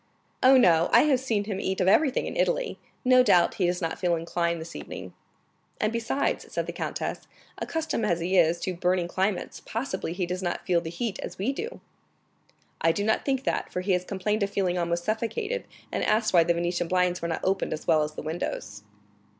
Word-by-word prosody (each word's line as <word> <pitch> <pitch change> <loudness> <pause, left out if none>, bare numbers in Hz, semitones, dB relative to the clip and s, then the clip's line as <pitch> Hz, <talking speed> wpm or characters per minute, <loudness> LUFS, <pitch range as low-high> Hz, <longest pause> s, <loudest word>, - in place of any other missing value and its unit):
"Oh, 260 +1 +7
no; 170 -8 +5
I - - +7
have 285 -4 +3
seen 225 -6 0
him 200 -2 -4
eat 190 -1 -2
of 185 - +2
everything 265 +7 +3
in - - -5
Italy; - - 0 0.3
no 255 0 +7
doubt 180 -8 +4
he 180 - +4
does 180 0 -1
not 165 - -2
feel 175 -2 +2
inclined 170 0 -1
this 160 +1 -8
evening." - - -8 0.7
"And 215 +1 0
besides," 235 +4 -1
said - - -2
the - - -5
countess, - - -4 0.3
"accustomed 315 -9 -2
as 175 -3 +1
he 180 +3 -1
is 170 -1 +4
to 185 - -2
burning 180 0 +1
climates, 190 +2 -2
possibly 220 -7 -3
he 180 0 -1
does 180 +2 -3
not 175 -2 -3
feel 175 -2 +2
the 165 - -5
heat 200 +5 -3
as - - -6
we 220 +9 0
do." 450 - -6 1.0
"I 165 - +4
do 200 - -2
not 220 +1 +1
think 270 -1 0
that, - - -1
for 180 - -2
he 195 +2 -1
has 180 -1 +2
complained 210 +3 -2
of 200 - +1
feeling 190 -3 0
almost 170 -1 -1
suffocated, 415 - -2 0.3
and - - -1
asked 215 0 +2
why 170 -2 +7
the 170 0 +2
Venetian 175 0 -1
blinds 180 0 +1
were 170 - -2
not 165 - -2
opened 190 +1 0
as 155 - -4
well 155 - +4
as 150 0 -2
the - - -6
windows." 175 - -4
185 Hz, 215 wpm, -27 LUFS, 175-225 Hz, 1.0 s, Oh